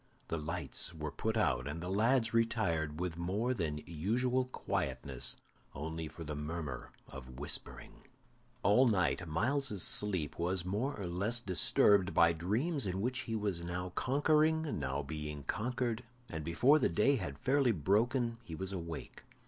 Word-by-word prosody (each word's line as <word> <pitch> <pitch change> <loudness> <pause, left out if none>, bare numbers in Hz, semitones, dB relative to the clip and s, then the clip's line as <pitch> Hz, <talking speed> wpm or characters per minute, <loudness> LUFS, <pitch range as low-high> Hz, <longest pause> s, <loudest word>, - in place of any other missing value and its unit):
The 85 - -1
lights 80 +2 -2
were 75 -1 -4
put 110 +9 -2
out, 70 - +1
and 75 +3 -4
the 90 - -5
lads 115 +5 +2
retired 85 -10 +1
with 90 -2 -3
more 105 +9 0
than 75 -8 -3
usual 120 +10 0
quietness, 70 - -2 0.4
only 80 +3 -4
for 80 +2 -9
the 75 -1 -4
murmur 75 -2 -4 0.2
of 65 -2 -10
whispering. 75 +1 -5 0.6
All 125 +6 +5
night 90 - +1
Myles's 120 - 0
sleep 95 -9 +1
was 90 +1 -1
more 110 +8 -2
or 100 - -3
less 100 +7 +1
disturbed 95 -2 +3
by 85 -1 +6
dreams 110 - 0
in 95 +1 -2
which 125 +4 -1
he 115 -3 -3
was 100 -6 -1
now 90 +1 -3
conquering, 155 - +2
now 70 +1 -2
being 75 0 -5
conquered, 120 - -2 0.3
and 80 -1 -4
before 125 - +4
the - - +2
day 120 +11 +3
had 70 - -5
fairly 135 - +3
broken 115 - +1
he 85 -8 -7
was 95 +3 -3
awake. 85 -4 -6
95 Hz, 155 wpm, -34 LUFS, 80-120 Hz, 0.6 s, by